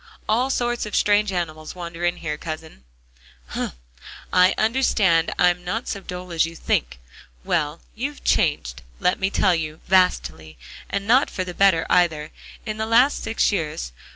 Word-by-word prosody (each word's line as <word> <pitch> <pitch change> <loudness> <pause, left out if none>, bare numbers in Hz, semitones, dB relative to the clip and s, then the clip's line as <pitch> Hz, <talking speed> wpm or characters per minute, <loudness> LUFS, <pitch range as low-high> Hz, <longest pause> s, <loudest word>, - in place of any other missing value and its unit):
"All 240 +5 +2
sorts 240 -3 -1
of 210 - -5
strange 205 0 +3
animals 155 -3 -4
wander 170 -1 -7
in 175 0 +1
here, 155 -3 -4
Cousin." 155 - -8 0.6
"Hum; - - -3 0.6
I 180 +1 +5
understand. 215 -8 +2
I'm 180 0 +3
not 210 +7 -3
so 200 - -3
dull 180 -1 -8
as 165 -1 +2
you 165 +1 -4
think. 60 - -1 0.5
Well, 155 -1 -1
you've 280 +6 -5
changed, - - +1 0.2
let 180 - +1
me 190 - +1
tell 195 -2 +2
you, 155 -1 -3
vastly, 80 - +1 0.3
and 200 0 -2
not 255 +6 +4
for 185 - -3
the 180 -1 -6
better 185 -4 +3
either, 155 -4 +2 0.3
in 215 -1 -4
the 220 0 -2
last 245 +5 +4
six 225 0 +1
years. 150 - -3
180 Hz, 160 wpm, -23 LUFS, 160-210 Hz, 0.6 s, I